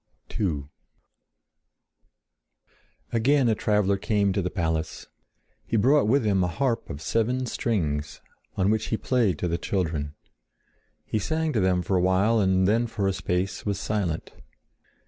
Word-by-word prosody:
II 80 -9 0 2.5
Again 130 +3 +3
a 115 - +4
traveler 105 -2 +1
came 100 -1 +1
to 100 - 0
the 90 - -2
palace. 80 -4 -2 0.6
He 115 - -1
brought 135 +3 +4
with 125 +1 +2
him 100 -3 +2
a - - +1
harp 120 +5 -1
of 70 +3 -7
seven 125 +3 0
strings, 80 - -2 0.4
on 95 +1 +2
which 110 -1 0
he 110 - -1
played 115 -8 +1
to 90 - -2
the 85 0 -1
children. 80 -6 -2 0.9
He 110 - -1
sang 160 +8 -1
to 110 - +1
them 90 -2 +2
for 95 - 0
a - - +2
while 95 +5 +3
and 95 -2 +3
then 115 +3 +2
for 105 -3 -2
a 95 - +1
space 90 +1 -2
was 100 -2 -2
silent. 95 -8 -2
100 Hz, 150 wpm, -26 LUFS, 90-115 Hz, 2.5 s, a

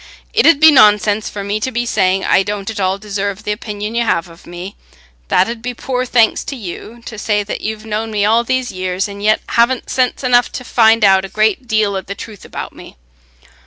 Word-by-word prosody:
It 460 - +4
'ud 330 -4 +5
be 315 +1 +8
nonsense 210 -4 +4
for 200 - -6
me 205 +2 -2
to 240 - -2
be 240 0 -2
saying, 190 -4 +1
I - - +4
don't 205 +1 -4
at 220 - -7
all 190 0 0
deserve 200 -1 -4
th' - - -5
opinion 210 0 -4
you 235 0 +1
have 175 -6 -1
of 165 0 -17
me; 175 +3 -8 0.5
that 185 - +3
'ud 230 0 -5
be 245 0 -5
poor 255 +1 -2
thanks 230 -3 +2
to 280 - -5
you, 230 +2 -9
to 220 - -8
say 210 -1 0
that 200 - -6
you've 215 0 -5
known 220 +1 -3
me 210 -2 0
all 225 +3 +3
these 255 +1 -1
years 185 +1 -2
and 200 0 -9
yet 215 +1 +2
haven't 235 +2 +1
sense 255 +1 0
enough 245 -1 +3
to 255 - -5
find 225 -2 +4
out 190 -1 +5
a 195 - -6
great 215 +4 0
deal 215 -3 +1
o' 190 - -2
the 200 +2 -7
truth 210 -2 -10
about - - -7
me. - - -13
215 Hz, 230 wpm, -16 LUFS, 200-235 Hz, 0.5 s, be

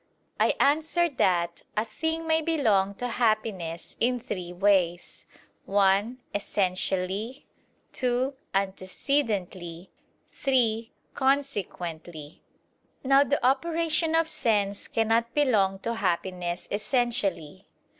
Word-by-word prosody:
I - - +3
answer 320 +4 +2
that, 175 - +1 0.2
A 215 - +2
thing 320 +9 -3
may 320 0 +2
belong 220 -12 +2
to 245 - -3
happiness 215 -8 -1
in 245 +1 +1
three 180 -6 -5
ways: 180 -2 +1 0.4
(1) 200 +4 +2 0.2
essentially, 195 +4 -1 0.5
(2) 255 +2 0 0.2
antecedently, 190 - -2 0.4
(3) 230 -4 +1 0.2
consequently. 175 - -2 0.6
Now 275 +1 +5
the 285 -2 0
operation 325 +4 +1
of 325 0 +3
sense 205 -7 0
cannot 225 +1 +1
belong 210 -10 +3
to 230 - -2
happiness 180 -3 -2
essentially. 205 - -1
215 Hz, 95 wpm, -27 LUFS, 185-265 Hz, 0.6 s, Now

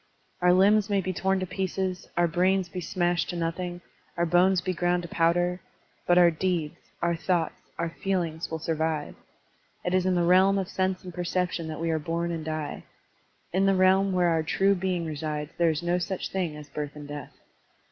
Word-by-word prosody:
Qur 180 0 +4
limbs 200 +3 +4
may 200 -1 +2
be 185 0 -2
torn 190 +2 +1
to - - -1
pieces, 185 0 -3
our 175 0 +4
brains 180 +2 +1
be 180 +1 -5
smashed 175 -1 0
to - - -3
nothing, 175 +1 -3 0.4
our 170 - +2
bones 180 +2 +4
be 185 +1 -2
groimd 175 0 0
to - - -6
powder; 175 +2 +1 0.5
but 175 - +5
our 175 -1 +7
deeds, 165 -2 -1 0.3
our 170 0 +2
thoughts, 170 -1 -1 0.2
our 170 - -1
feel 190 +1 -1
ings 160 +1 -5
will 160 - -3
survive. 160 -1 -2 0.7
It 180 - 0
is 185 0 +2
in 185 - +2
the 175 - +2
realm 190 +3 +5
of 190 -1 -2
sense 185 0 -1
and 180 -1 -8
perception 180 -1 -2
that 155 -1 -5
we 165 0 0
are 160 - 0
bom 170 +2 -2
and 165 -2 -4
die. 155 -1 -4 0.7
In 190 +2 +3
the 195 - +4
realm 190 +1 +4
where 180 -2 +3
our 165 -1 +2
true 195 +5 +2
being 180 -2 -1
resides 150 -1 -4
there 170 -1 +4
is 160 +1 -2
no 175 +1 +1
such 185 +1 -3
thing 180 -5 -2
as 150 -1 -10
birth 145 0 -5
and 145 -1 -9
death. 145 0 -7
175 Hz, 205 wpm, -27 LUFS, 165-185 Hz, 0.7 s, our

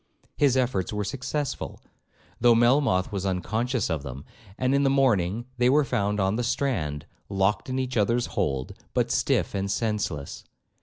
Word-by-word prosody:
His 135 -3 +3
efforts 120 -8 0
were 105 -1 -2
successful, 135 +6 -3 0.6
though 120 -1 +6
Melmoth 120 -6 +3
was 100 -2 -3
unconscious 110 +6 -1
of 80 -4 -2
them; 70 0 -8 0.3
and 130 +1 +1
in 140 - +3
the 140 - +3
morning 120 -6 +2
they 125 0 +4
were 145 +2 +4
found 105 -3 0
on 95 +2 +1
the 120 - 0
strand, 90 - -1 0.2
locked 95 +3 0
in 130 - -2
each 130 -1 -2
other's 115 +3 +2
hold, 65 -1 -1 0.2
but - - +1
stiff - - +1
and 100 0 -2
senseless. 100 -9 -2
110 Hz, 160 wpm, -26 LUFS, 95-130 Hz, 0.6 s, though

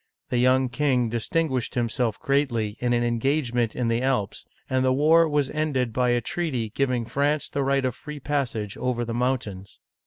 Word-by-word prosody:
The 125 - 0
young 130 +1 +4
king 125 -2 +1
distin 160 +8 0
guished 130 -4 -3
himself 115 -2 -1
greatly 120 -7 0
in 125 0 0
an 120 0 +2
engagement 120 -1 0
in 125 -2 -1
the 115 +1 +1
Alps, 130 -7 -1 0.2
and 130 0 +1
the 130 - +3
war 160 +4 +4
was 145 -2 0
ended 140 -6 -1
by 125 +1 +1
a 120 0 +3
treaty 125 -6 -2
giving 125 -1 0
France 140 +5 0
the 140 - -2
right 135 0 +1
of 130 - 0
free 150 +3 -9
passage 130 -8 -2
over 125 -1 -1
the 115 - -4
mountains. 120 -6 -2
125 Hz, 185 wpm, -25 LUFS, 120-140 Hz, 0.2 s, young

